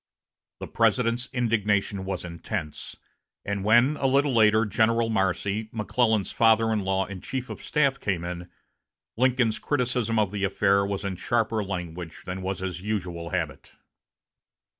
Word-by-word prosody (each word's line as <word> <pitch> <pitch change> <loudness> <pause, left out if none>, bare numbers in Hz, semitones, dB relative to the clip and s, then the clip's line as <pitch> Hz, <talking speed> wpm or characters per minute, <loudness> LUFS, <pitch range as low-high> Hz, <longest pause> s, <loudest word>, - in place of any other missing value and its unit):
The - - -5
President's 115 +2 +1
indignation 105 -5 0
was 95 -2 -4
intense; 85 -1 -6 0.5
and 100 -1 -2
when, 120 +8 +4
a 135 - +1
little 140 +1 +2
later, 110 -1 +5
General 115 +3 +2
Marcy, 100 +2 0
McClellan's 110 -1 +1
father 115 0 +4
in 110 - +1
law 95 0 0
and 95 -2 -8
chief 130 -1 -4
of - - -8
staff, 140 -3 +1
came 95 -4 -1
in, 90 0 -6 0.7
Lincoln's 125 -2 +2
criticism 125 -5 0
of 105 -3 +2
the 100 -1 -3
affair 100 0 +3
was 100 0 -3
in 95 -2 -3
sharper 115 0 0
language 85 -4 -6
than 90 +1 -5
was 95 0 -3
his 90 -2 -4
usual 90 -5 -3
habit. 80 -7 -4
105 Hz, 145 wpm, -26 LUFS, 95-115 Hz, 0.7 s, later